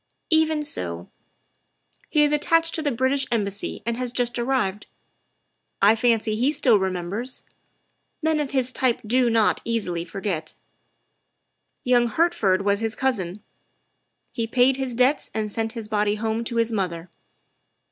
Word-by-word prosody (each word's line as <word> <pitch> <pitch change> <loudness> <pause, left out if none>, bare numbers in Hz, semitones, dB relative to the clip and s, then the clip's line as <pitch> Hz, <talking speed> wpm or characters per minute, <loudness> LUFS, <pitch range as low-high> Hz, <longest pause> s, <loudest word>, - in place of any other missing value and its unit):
" - - -52
Even 315 -1 +3
so. 85 - -4 1.0
He 300 - +3
is 295 - +3
attached 330 +2 +2
to 320 - -1
the 300 - 0
British 260 +2 0
Embassy 205 -3 -2
and 235 0 -1
has 250 -1 -2
just 245 -1 0
arrived. 235 -6 -1 0.9
I 205 +3 +5
fancy 225 -2 +1
he 250 +6 +2
still 250 -7 +4
remembers; 190 +6 -3 0.8
men 315 -1 +1
of 290 -2 -1
his 260 -2 0
type 250 -2 0
do 245 +2 +2
not 225 -2 +3
forget - - -20
easily. 185 -7 -2 1.8
Young 245 -1 +3
Hertford 220 - +1
was 200 0 +2
his 225 -1 -2
cousin; 210 -7 -2 0.9
he 230 -3 -3
paid 250 +3 +3
his 260 -3 -3
debts 255 +4 +2
and 215 -1 -2
sent 225 +1 -2
his 225 -3 -6
body 210 -1 +1
home 220 +1 -2
to 235 - -3
his 230 0 +1
mother. 180 -5 -2
235 Hz, 145 wpm, -24 LUFS, 210-260 Hz, 1.8 s, I